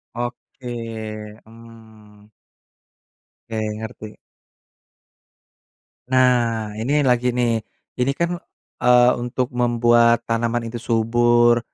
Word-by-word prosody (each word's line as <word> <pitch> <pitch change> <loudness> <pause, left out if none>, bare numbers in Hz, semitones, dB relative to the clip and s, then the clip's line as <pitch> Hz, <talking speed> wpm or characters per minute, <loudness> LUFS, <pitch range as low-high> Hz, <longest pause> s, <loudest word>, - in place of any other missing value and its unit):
Oke, 115 -3 -7
mmm. 110 -2 -17 1.2
Oke, 115 - -6 0.2
ngerti. 110 -1 -9 1.9
Nah, 120 -4 +2
ini 145 +6 +1
lagi 125 -1 +1
nih, 120 -2 +1 0.4
jadi 130 +2 +2
kan, 170 +2 0 0.5
eee, 125 0 +5
untuk 125 +1 -3
membuat 120 -1 +3
tanaman 115 +1 -1
itu 120 - -5
subur, 120 +1 +3
120 Hz, 80 wpm, -21 LUFS, 115-120 Hz, 1.9 s, eee